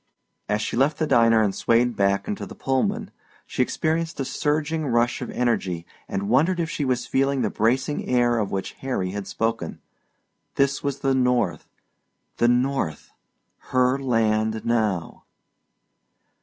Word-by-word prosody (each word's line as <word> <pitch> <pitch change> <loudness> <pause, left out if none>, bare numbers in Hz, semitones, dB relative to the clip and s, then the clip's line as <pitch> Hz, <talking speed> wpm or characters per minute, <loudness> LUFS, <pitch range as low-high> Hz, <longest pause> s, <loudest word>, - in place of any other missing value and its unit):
As 105 +1 0
she - - -3
left 140 +5 +2
the 160 - 0
diner 115 -5 +4
and 100 -2 +1
swayed 120 +2 +2
back 100 0 +1
into 210 -2 -4
the - - -10
Pullman 200 - -1 0.3
she - - -2
experienced 160 +5 -1
a 135 - -1
surging 150 +2 -1
rush 120 -1 +1
of - - -4
energy 95 -9 -1 0.2
and 100 +1 -3
wondered 160 - +3
if 165 -1 -1
she 150 - -2
was 130 -2 0
feeling 135 -1 +1
the 105 - 0
bracing 130 +6 0
air 120 -2 +3
of 105 -2 -1
which 95 -1 -3
Harry 110 -9 -2
had 100 0 -5
spoken. 115 0 -2 0.8
This 140 0 +1
was 140 -1 -3
the 135 0 +2
North, 125 -1 +1 0.7
the 120 - +3
North 125 - 0 0.6
her 130 +1 +3
land 110 -3 +1
now! 110 -7 -1
125 Hz, 150 wpm, -24 LUFS, 110-140 Hz, 0.8 s, diner